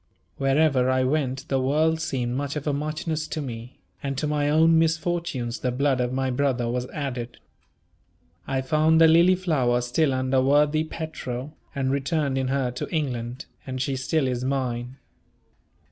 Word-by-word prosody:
Wherever 135 -2 +3
I 130 0 +2
went 135 0 -1
the 135 -1 0
world 155 +4 +2
seemed 125 -6 -2
much 140 +1 -3
of 150 - -4
a 145 - 0
muchness 155 +2 -3
to - - -4
me; 120 -3 -7 0.2
and 135 -1 -3
to 150 - -1
my 150 -1 0
own 160 +2 +5
misfortunes 160 -7 -1
the 125 - -1
blood 135 0 +1
of 125 0 -1
my 130 0 -1
brother 125 -2 0
was 125 +1 -2
added. 125 -5 -5 1.1
I 135 -1 0
found 155 +4 +3
the 165 - +8
"Lilyflower" 165 -7 +4
still 135 +4 +1
under 130 0 +1
worthy 145 +3 +3
Petro, 150 -4 -6 0.2
and 135 -1 0
returned 140 0 0
in 130 - -1
her 130 -1 0
to 125 - -5
England, 125 -4 -3 0.2
and 130 0 -4
she 135 +1 -1
still 135 +2 0
is 125 -1 -2
mine. 130 -1 -2
135 Hz, 160 wpm, -25 LUFS, 130-155 Hz, 1.1 s, the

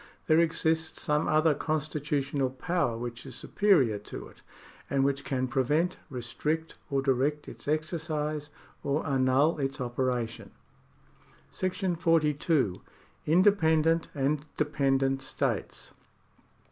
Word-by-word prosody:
There 155 0 +4
exists 160 -1 +1
some 150 -1 0
other 155 0 +4
constitutional 145 -3 -1
power 130 -2 -1
which 120 0 -6
is 130 -3 -9
superior 135 - +2
to 105 - -8
it, - - -19 0.5
and 135 0 +2
which 140 0 0
can 130 -2 -1
prevent, 150 +7 +1
restrict, 150 +6 -3 0.2
or 135 -2 0
direct 140 +3 +1
its - - -10
exercise, 155 -1 -2 0.3
or 140 +3 0
annul 135 +3 +2
its 135 0 -2
operation. 120 -2 -2 1.0
^ 185 +1 -2
§ 165 - -7
42. 150 - +2 0.5
independent 165 -2 +4
and 145 +1 0
Dependent 135 -3 +1
States. 135 - -3
150 Hz, 110 wpm, -29 LUFS, 135-160 Hz, 1.0 s, There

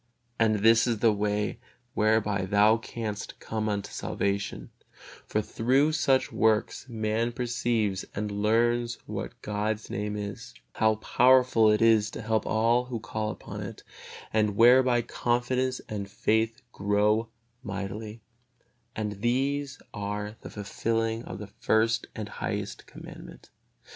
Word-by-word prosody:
And 110 -2 +3
this 115 +2 +5
is 115 -2 +1
the 110 +1 +4
way 105 +1 -1 0.3
whereby 105 -3 +2
thou 105 +3 +5
canst 110 -2 -6
come 110 -1 -3
unto 100 -1 -3
salvation; 100 0 -3 0.6
for 105 - 0
through 135 +9 +2
such 135 -4 +2
works 110 +3 +1
man 110 +1 -1
perceives 115 -5 -1
and 105 0 -2
learns 115 +3 +1
what - - -6
God's 105 +1 -2
Name 105 +1 -3
is, 100 -1 -6 0.2
how 110 0 +3
powerful 125 0 +4
it 105 +1 +2
is 110 -2 +4
to 115 - -7
help 110 0 0
all 115 +3 +2
who 125 -2 -4
call 110 -1 -3
upon - - -7
it; - - -8 0.5
and 105 -2 +2
whereby 120 +1 +5
confidence 125 +2 0
and 100 -2 -5
faith 110 +4 0
grow 105 +2 +1 0.3
mightily, 105 +1 -6 0.7
and 105 -2 -4
these 135 +3 0
are 105 +1 -4
the - - -8
fulfilling 115 +2 -2
of 95 - -7
the 105 - -7
first 115 +3 +1
and 110 -1 -5
highest - - -5
Commandment. - - -12
110 Hz, 130 wpm, -28 LUFS, 105-120 Hz, 0.7 s, this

